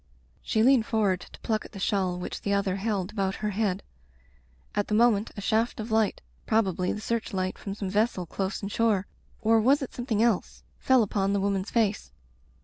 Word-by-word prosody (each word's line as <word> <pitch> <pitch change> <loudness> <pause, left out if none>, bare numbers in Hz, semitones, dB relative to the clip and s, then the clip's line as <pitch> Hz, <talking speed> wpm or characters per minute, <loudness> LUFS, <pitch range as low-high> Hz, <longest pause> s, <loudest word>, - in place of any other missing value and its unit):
She 220 - +1
leaned 250 -2 +5
forward 205 -5 +1
to - - -13
pluck 220 -2 -1
at - - -13
the 195 - -7
shawl 190 -2 0
which 180 - -5
the 200 - -1
other 195 -1 0
held 200 -2 -2
about 195 -2 -1
her 210 - 0
head. 200 -2 -1 0.9
At 205 -1 0
the 210 - 0
moment 225 -2 +3
a - - -4
shaft 225 +4 0
of 220 +1 -5
light, 220 -2 +1 0.3
probably 190 -5 +1
the - - -4
search 230 0 -2
light 185 -1 -1
from 195 -1 -6
some 200 -2 -4
vessel 210 -3 +1
close 190 +5 -3
inshore 205 -1 +1 0.2
— - - -33
or 225 0 +4
was 275 +5 +4
it 265 - -7
something 230 -3 0
else? 230 -6 0
— - - -33
^fell 260 -3 +5
upon 200 -1 0
the 200 - +1
woman's 195 0 -1
face. 215 - 0
210 Hz, 205 wpm, -27 LUFS, 195-225 Hz, 0.9 s, leaned